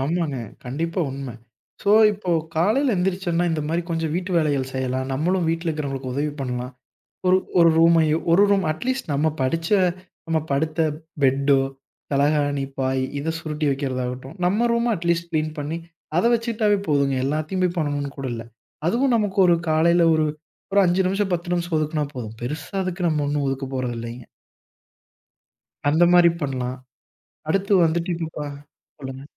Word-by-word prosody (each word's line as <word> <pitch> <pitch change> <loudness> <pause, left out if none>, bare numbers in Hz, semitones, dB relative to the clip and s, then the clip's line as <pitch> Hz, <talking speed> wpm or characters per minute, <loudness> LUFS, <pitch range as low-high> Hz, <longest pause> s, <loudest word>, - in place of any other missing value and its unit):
ஆமாங்க, 155 0 -1 0.3
கண்டிப்பா 165 +8 -2
உண்மை. 135 -3 -6 0.5
சோ 200 - +2 0.2
இப்போ 195 -3 -4 0.3
காலையில 225 - +3
எந்திருச்சோனா, 180 -1 0
இந்த 160 - -1
மாரி 170 +2 0
கொஞ்சம் 165 -2 -1
வீட்டு 185 +1 -3
வேலைகள் 145 -5 +1
செய்யலாம். 130 0 -1
நம்மலும் 170 +5 +1
வீட்ல 165 +1 -2
இருக்கிறவர்களுக்கு 135 -4 -3
உதவி 145 +2 -1
பண்ணலாம். 125 0 -3 0.5
ஒரு 185 +1 +6 0.2
ஒரு 170 -1 +7
ரூமையோ, 165 -1 +5
ஒரு 185 +4 +6
ரூம். 195 -3 +2
அட் 155 - -9
லீஸ்ட் 260 -7 -1
நம்ம 145 +3 +2
படிச்ச, 165 +5 -1 0.6
நம்ம 165 -1 +1
படுத்த 155 +3 0 0.4
ஃபெட்டோ, 135 0 +3 0.5
தலகாணி, 145 0 +2
பாய் 130 0 0 0.2
இத 150 - -3
சுருட்டி 155 -1 -3
வைக்கிறதாகட்டும். 130 0 -3
நம்ம 210 +6 +2
ரூம்ம 235 0 +1
அட்லீஸ்ட் 170 0 -1
கிளீன் 155 -1 -1
பண்ணி, 150 +3 -3 0.4
அதை 180 - +3
வைச்சிடாலே 220 -3 +1
போதுங்க. 140 -2 +2
எல்லாத்தையும் 165 +5 -1
பண்ணணும்னு 145 -2 -1
கூட 135 - -3
இல்ல. 115 - -5 0.4
அதுவும் 245 +6 +2
நமக்கு 205 -3 -1
ஒரு 170 - +5
காலையில 170 +2 +4
ஒரு 155 0 +2 0.5
ஒரு 200 - +5
5 180 +1 +2
நிமிஷம் 195 +2 0
10 175 0 -2
நிமிஷம் 175 -1 -1
ஒதுக்குனா 155 0 0
போதும். 115 -4 -6
பெருசா 145 +7 -5
அதுக்கு 185 0 -4
நம்ம 155 -2 +1
ஒன்னும் 145 0 0
ஒதுக்கப் 135 0 -3
போறதில்லைங்க. 120 -1 -4 1.6
அந்த 160 +4 +4
மாரி 175 -1 +7
பண்லாம். 130 -2 -2 0.7
அடுத்து 195 +5 +1
வந்துடிடிப்பா 165 -2 -2 0.5
சொல்லுங்க. 135 -1 -7
155 Hz, 145 wpm, -23 LUFS, 140-175 Hz, 1.6 s, ஒரு